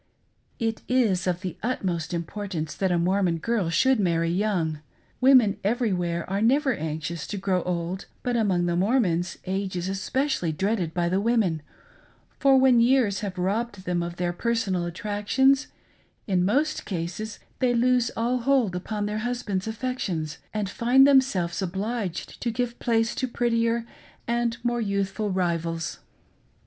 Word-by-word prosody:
It 225 Hz, -2 st, -2 dB
is 215 Hz, -8 st, +2 dB
of 180 Hz, 0 st, 0 dB
the 185 Hz, -2 st, -5 dB
utmost 185 Hz, -9 st, -2 dB
importance 170 Hz, -1 st, -4 dB
that 190 Hz, -2 st, 0 dB
a 175 Hz, -, +2 dB
Mor 185 Hz, +4 st, +2 dB
mon 175 Hz, -3 st, +1 dB
girl 205 Hz, 0 st, 0 dB
should 260 Hz, +9 st, +3 dB
marry 170 Hz, -3 st, +1 dB
young. 175 Hz, -5 st, 0 dB, 0.4 s
Women 255 Hz, -6 st, +5 dB
everywhere 185 Hz, -7 st, 0 dB
are 195 Hz, +2 st, -1 dB
never 270 Hz, +4 st, +3 dB
anxious 160 Hz, -1 st, -4 dB
to 205 Hz, -, -4 dB
grow 190 Hz, -2 st, 0 dB
old, 180 Hz, +1 st, -3 dB, 0.2 s
but 245 Hz, -1 st, 0 dB
among 190 Hz, -6 st, +2 dB
the 175 Hz, 0 st, 0 dB
Mormons 180 Hz, -4 st, +1 dB
age 190 Hz, 0 st, -2 dB
is 175 Hz, 0 st, -2 dB
especially 195 Hz, -, -1 dB
dreaded 190 Hz, -1 st, -1 dB
by 175 Hz, -1 st, +1 dB
the 185 Hz, +3 st, +1 dB
women, 210 Hz, -8 st, +1 dB, 0.8 s
for 270 Hz, -1 st, +5 dB
when 260 Hz, -2 st, +5 dB
years 235 Hz, -5 st, +3 dB
have 200 Hz, -3 st, -5 dB
robbed 200 Hz, +2 st, -2 dB
them 175 Hz, -1 st, 0 dB
of 170 Hz, 0 st, -4 dB
their 175 Hz, 0 st, -1 dB
personal 195 Hz, -4 st, 0 dB
attractions, 210 Hz, -, +1 dB, 0.6 s
in 185 Hz, -3 st, +1 dB
most 285 Hz, +11 st, +1 dB
cases 185 Hz, +4 st, -4 dB, 0.2 s
they 250 Hz, -2 st, +2 dB
lose 245 Hz, 0 st, +3 dB
all 245 Hz, +2 st, +1 dB
hold 245 Hz, -6 st, +2 dB
upon, 205 Hz, +3 st, -3 dB
their 210 Hz, +1 st, -2 dB
husband's 220 Hz, -5 st, -2 dB
affections 220 Hz, -, -3 dB
and 210 Hz, -2 st, -2 dB
find 245 Hz, +7 st, +4 dB
themselves 260 Hz, -12 st, +3 dB
obliged 195 Hz, 0 st, -3 dB
to 240 Hz, -, 0 dB
give 240 Hz, +1 st, -2 dB
place 225 Hz, -1 st, +1 dB
to 260 Hz, -, -2 dB
prettier 230 Hz, -1 st, 0 dB, 0.4 s
and 235 Hz, 0 st, 0 dB
more 240 Hz, -1 st, 0 dB
youthful 200 Hz, 0 st, -1 dB
rivals. 170 Hz, -3 st, -1 dB
200 Hz, 150 wpm, -25 LUFS, 175-235 Hz, 0.8 s, Women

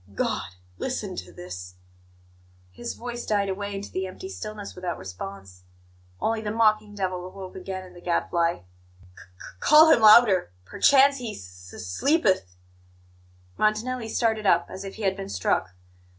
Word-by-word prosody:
"God! -, -, -1 dB, 0.3 s
Listen -, -, -3 dB
to 90 Hz, -1 st, -7 dB
this 90 Hz, +1 st, -9 dB, 0.5 s
" 90 Hz, 0 st, -31 dB, 0.3 s
His 240 Hz, -, -6 dB
voice 240 Hz, 0 st, -6 dB
died 200 Hz, -2 st, 0 dB
away 200 Hz, +1 st, -4 dB
into 195 Hz, +1 st, -6 dB
the 190 Hz, 0 st, -2 dB
empty 375 Hz, -, -8 dB
stillness 215 Hz, -, -7 dB
without 180 Hz, -1 st, -4 dB
response. 95 Hz, 0 st, -9 dB, 0.6 s
Only 225 Hz, -, 0 dB
the 210 Hz, -, -3 dB
mocking 215 Hz, -1 st, +2 dB
devil 185 Hz, -2 st, -2 dB
awoke 185 Hz, 0 st, -9 dB
again 185 Hz, 0 st, -6 dB
in 180 Hz, -, -14 dB
the 175 Hz, -, -13 dB
Gadfly. 170 Hz, -1 st, 0 dB
"'C -, -, -26 dB, 0.5 s
c 90 Hz, 0 st, -14 dB
call 310 Hz, +2 st, +7 dB
him 230 Hz, -, +5 dB
louder; 210 Hz, -, +7 dB
perchance 275 Hz, -, +5 dB
he 240 Hz, -4 st, -5 dB
s 90 Hz, -1 st, -12 dB
s 95 Hz, -, -8 dB
sleepeth' 185 Hz, -, +1 dB, 0.5 s
" 90 Hz, 0 st, -31 dB
Montanelli 225 Hz, +2 st, 0 dB
started 220 Hz, -2 st, 0 dB
up 170 Hz, -1 st, +4 dB
as 190 Hz, +1 st, -7 dB
if 195 Hz, -, -8 dB
he 220 Hz, -, -7 dB
had 190 Hz, -1 st, +1 dB
been 195 Hz, 0 st, -7 dB
struck. 95 Hz, 0 st, 0 dB
190 Hz, 165 wpm, -25 LUFS, -, 0.6 s, call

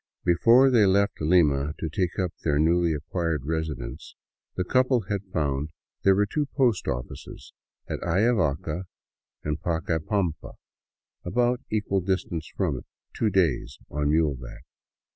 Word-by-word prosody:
Before 115 Hz, +10 st, +5 dB
they 110 Hz, -5 st, +5 dB
left 100 Hz, 0 st, +2 dB
Lima 75 Hz, -3 st, +3 dB
to 80 Hz, -, -3 dB
take 85 Hz, +3 st, -2 dB
up 90 Hz, -3 st, 0 dB
their 75 Hz, -3 st, 0 dB
newly 85 Hz, +2 st, +3 dB
acquired 80 Hz, -1 st, -2 dB
residence, 80 Hz, -1 st, -4 dB, 0.4 s
the 90 Hz, -, 0 dB
couple 125 Hz, +4 st, +2 dB
had 100 Hz, 0 st, -3 dB
found 75 Hz, -2 st, -1 dB, 0.3 s
there 95 Hz, 0 st, +5 dB
were 105 Hz, +1 st, +3 dB
two 145 Hz, +7 st, -2 dB
post 125 Hz, -, +2 dB
offices, -, -, -6 dB, 0.3 s
at -, -, -3 dB
Ayavaca 90 Hz, -, +1 dB, 0.6 s
and 75 Hz, +1 st, -3 dB
Pacai 80 Hz, -1 st, -1 dB
pampa, 95 Hz, -6 st, -2 dB, 0.7 s
about 120 Hz, +6 st, +1 dB
equal 105 Hz, -3 st, 0 dB
distance 90 Hz, -3 st, -2 dB
from -, -, 0 dB
it, -, -, -13 dB, 0.2 s
— -, -, -55 dB
two 110 Hz, -, +1 dB
days 85 Hz, -10 st, +1 dB
on 75 Hz, 0 st, 0 dB
muleback. 75 Hz, -6 st, -1 dB
85 Hz, 140 wpm, -26 LUFS, 75-100 Hz, 0.7 s, Before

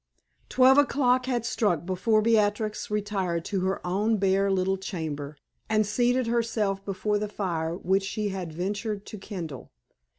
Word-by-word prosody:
Twelve 265 Hz, +2 st, +6 dB
o'clock 255 Hz, -3 st, +2 dB
had 240 Hz, -3 st, -1 dB
struck 205 Hz, -, 0 dB
before 210 Hz, +4 st, +2 dB
Beatrix 215 Hz, -1 st, +1 dB
retired 195 Hz, -5 st, -1 dB
to 195 Hz, -, -1 dB
her 190 Hz, 0 st, -2 dB
own 210 Hz, +5 st, +1 dB
bare 195 Hz, 0 st, +2 dB
little 190 Hz, 0 st, +1 dB
chamber, 155 Hz, -6 st, -5 dB, 0.3 s
and 215 Hz, -1 st, +3 dB
seated 245 Hz, +4 st, +1 dB
herself 225 Hz, -4 st, 0 dB
before 200 Hz, +2 st, -1 dB
the 210 Hz, -, -2 dB
fire 170 Hz, -5 st, -2 dB
which 190 Hz, +2 st, +1 dB
she 205 Hz, +2 st, -2 dB
had 185 Hz, -4 st, -5 dB
ventured 200 Hz, +5 st, -3 dB
to 215 Hz, -, -8 dB
kindle. 170 Hz, -, -7 dB
200 Hz, 145 wpm, -27 LUFS, 185-220 Hz, 0.3 s, Twelve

